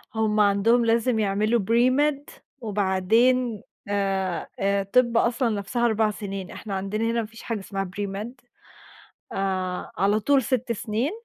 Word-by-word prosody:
هُم 215 -1 +1
عندهُم 210 +4 +3
لازم 230 0 +2
يعملوا 215 +3 +1
pre-med 255 +7 +2 0.3
وبعدين 215 +3 +1 0.3
آآ، 195 -3 -1
آآ 200 0 +1
طِب 235 +3 +2
أصلًا 235 +1 +2
نفْسها 220 +3 -1
4 220 -2 +2
سنين، 195 -3 -6
إحنا 200 -3 -6
عندنا 195 +3 -2
هنا 230 0 0
ما - - -4
فيش 225 0 -13
حاجة 225 -3 -3
اسمها 195 -1 -4
pre-med 205 +3 -4 1.0
آآ 185 -2 -2
على 200 +4 +2
طول 270 +4 +3
6 250 -2 -1
سنين، 225 - -2
215 Hz, 140 wpm, -25 LUFS, 195-235 Hz, 1.0 s, عندهُم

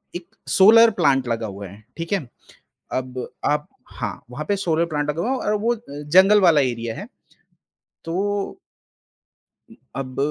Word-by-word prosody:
1 175 -1 -7 0.2
solar 230 +4 +7
plant 135 -3 +3
लगा 115 -1 -2
हुआ 100 0 -8
है 100 +4 -14
ठीक 165 0 -5
है। 200 - +2 0.7
अब 130 -1 -3 0.2
आप - - +1 0.2
हाँ, - - -6
वहाँ 140 +5 -5
पे 205 - +2
सोलर 170 -4 0
प्लांट 150 -2 -2
लगा 160 +3 -3
हुआ 245 - -1
है 265 - +1
और - - +2
वो 235 +3 +1 0.4
जंगल 200 +3 +7
वाला 170 -6 +5
एरिया 115 -3 -2
है, 205 - -7 1.0
तो 200 - -2 1.1
उ - - -13 0.2
अब, 130 -1 -5
160 Hz, 155 wpm, -22 LUFS, 125-200 Hz, 1.1 s, सोलर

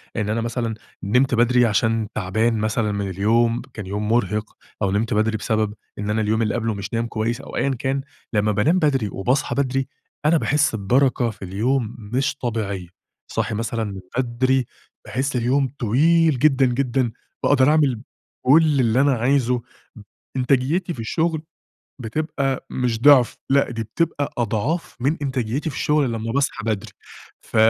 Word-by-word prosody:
إن 105 -2 -1
أنا 115 +2 0
مثلًا 115 -1 -2 0.3
نِمت 125 +6 +2
بدري 120 +1 +4
عشان 110 0 +1
تعبان 110 +4 +1
مثلًا 110 0 0
من 100 -1 -2
اليوم، 115 +5 +2
كان 105 - -6
يوم 105 +2 -3
مرهق، 110 -2 0 0.2
أو 100 - +1
نِمت 105 +3 0
بدري 110 +1 +1
بسبب 110 -1 0 0.3
إن 105 0 -3
أنا 110 +1 +1
اليوم 110 +1 +1
اللي 110 -2 0
قبلُه 115 -2 -1
مش 100 +2 -6
نايم 115 +1 0
كويس 115 +2 -2
أو - - -10
أيًا 140 - +1
كان، 135 +1 -1 0.3
لمّا 105 0 +2
بانام 115 - +2
بدري 135 -9 +1
وباصحى 125 +10 0
بدري، 135 -1 0 0.4
أنا 160 +2 +5
باحس 150 -4 +1
ببرَكة 125 +4 +2
في 110 - -11
اليوم 115 +5 -1
مش 120 +7 -1
طبيعية، 105 -8 -3 0.4
صاحي 110 - -1
مثلًا 115 +1 -2
من 100 -3 -5 0.2
بدري، 130 +1 +1 0.4
باحس 130 +4 -2
اليوم 130 +3 +2
طويل 155 +5 +3
جدًا 135 -2 +4
جدًا، 125 -1 0 0.3
باقدر 135 -1 +4
أعمِل 145 -7 +2 0.4
كلّ 150 +1 +5
اللي 120 +1 +3
أنا 140 0 +4
عايزُه. 125 0 +1 0.8
إنتاجيتي 140 +8 +1
في - - -11
الشغل 160 +7 -1 0.6
بتبقى 135 +2 -2
مش 120 -3 -1
ضِعف، 140 -4 +6
لأ، 140 -1 +3
دي 115 -1 -3
بتبقى 145 +5 -2
أضعاف 120 - -1
من 140 +6 +1
إنتاجيتي 135 +2 -2
في - - -9
الشغل 150 -5 +1
لمّا 115 0 -3
باصحى 135 -4 -1
بدري. 110 -3 -2 0.5
ف - - -8
120 Hz, 160 wpm, -22 LUFS, 110-135 Hz, 0.8 s, ضِعف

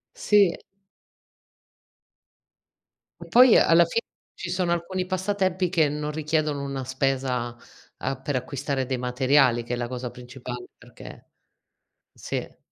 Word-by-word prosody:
Sì. 205 - +4 2.7
E - - -13
poi 250 -1 +7
alla 170 +1 +5
fine 170 +7 0 0.3
ci 175 - -7
sono 180 -1 0
alcuni 180 +2 -2
passatempi 185 -1 0
che 160 -4 +2
non 150 0 -3
richiedono 150 -2 -1
una 140 -1 -4
spesa, 130 -2 -1 0.4
ehm, 135 -1 -3
per 145 - -2
acquistare 135 +1 -2
dei 130 -1 -1
materiali 125 0 +3
che 120 - -5
è - - +1
la 120 0 -3
cosa 125 0 -5
principale 125 0 -8
perché - - -13 0.9
sì - - -6
eh! - - -7
140 Hz, 125 wpm, -25 LUFS, 125-175 Hz, 2.7 s, poi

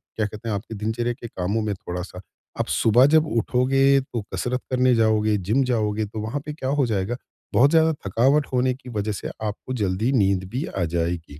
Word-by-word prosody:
क्या 110 - 0
कहते 105 +2 -7
हैं 105 - 0
आपके 110 +3 -6
दिनचर्या 110 +3 -2
के 120 - -9
कामों 100 +2 -2
में 105 -1 -1
थोड़ा-सा 90 0 -7 0.4
आप - - 0
सुबह 120 +3 +4
जब 160 0 +5
उठोगे 135 +4 +3
तो 120 -3 -5
कसरत 125 +1 -2
करने 130 0 +3
जाओगे, 110 -1 +2
जिम 110 +9 +1
जाओगे 110 -4 0
तो 110 +1 -7
वहाँ 115 +7 -3
पे 150 - -5
क्या 130 -3 -4
हो 140 -1 +2
जाएगा, 110 0 -1 0.4
बहुत 140 +3 +5
ज़्यादा 160 -1 +5 0.2
थकावट 135 +9 +3
होने 125 0 +2
की 125 0 -12
वजह 105 -2 -2
से 100 - -5 0.2
आपको 105 +4 -4
जल्दी 105 +1 0
नींद 100 -7 +2
भी 130 +7 -3
आ 95 - -3
जाएगी। 85 -3 -2
115 Hz, 200 wpm, -23 LUFS, 100-130 Hz, 0.4 s, जब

